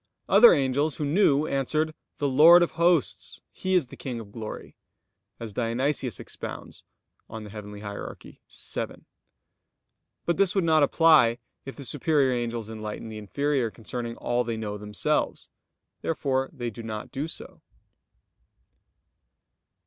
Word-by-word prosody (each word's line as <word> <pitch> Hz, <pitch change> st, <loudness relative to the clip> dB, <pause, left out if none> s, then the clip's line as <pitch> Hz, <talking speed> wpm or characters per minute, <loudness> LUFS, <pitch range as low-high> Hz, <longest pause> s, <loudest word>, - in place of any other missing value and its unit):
other 215 Hz, +5 st, +8 dB
angels, 140 Hz, +2 st, +1 dB
who 150 Hz, -, -3 dB
knew, 150 Hz, -2 st, +3 dB
answered: 155 Hz, +3 st, 0 dB, 0.2 s
"The 145 Hz, -, 0 dB
Lord 160 Hz, +6 st, +8 dB
of 175 Hz, -, -1 dB
Hosts, 170 Hz, -3 st, +1 dB
He 185 Hz, 0 st, -1 dB
is 175 Hz, -6 st, +3 dB
the -, -, -12 dB
King 125 Hz, -3 st, -5 dB
of 105 Hz, -3 st, -10 dB
glory," 110 Hz, 0 st, -8 dB, 0.6 s
as 115 Hz, -3 st, -7 dB
Dionysius 125 Hz, +3 st, -1 dB
expounds -, -, -8 dB, 0.5 s
(Coel. 110 Hz, 0 st, -7 dB
Hier. 105 Hz, -1 st, -7 dB
vii). -, -, -15 dB, 1.8 s
But 170 Hz, -, +1 dB
this 195 Hz, -1 st, +2 dB
would 195 Hz, -, +2 dB
not 160 Hz, -2 st, +4 dB
apply 145 Hz, -5 st, +5 dB, 0.3 s
if 135 Hz, -, -7 dB
the 140 Hz, -, -6 dB
superior 140 Hz, 0 st, +2 dB
angels 120 Hz, -2 st, -3 dB
enlightened 110 Hz, 0 st, -6 dB
the 110 Hz, -, -6 dB
inferior 135 Hz, +3 st, 0 dB
concerning 115 Hz, +1 st, -6 dB
all 120 Hz, 0 st, 0 dB
they 115 Hz, -1 st, -3 dB
know 105 Hz, -2 st, -4 dB
themselves. 105 Hz, -1 st, -2 dB, 0.5 s
Therefore 135 Hz, -4 st, -1 dB
they 120 Hz, -6 st, -5 dB
do 115 Hz, -, -9 dB
not 110 Hz, -1 st, -6 dB
do 145 Hz, +4 st, -3 dB
so. -, -, -9 dB
130 Hz, 135 wpm, -26 LUFS, 115-155 Hz, 1.8 s, other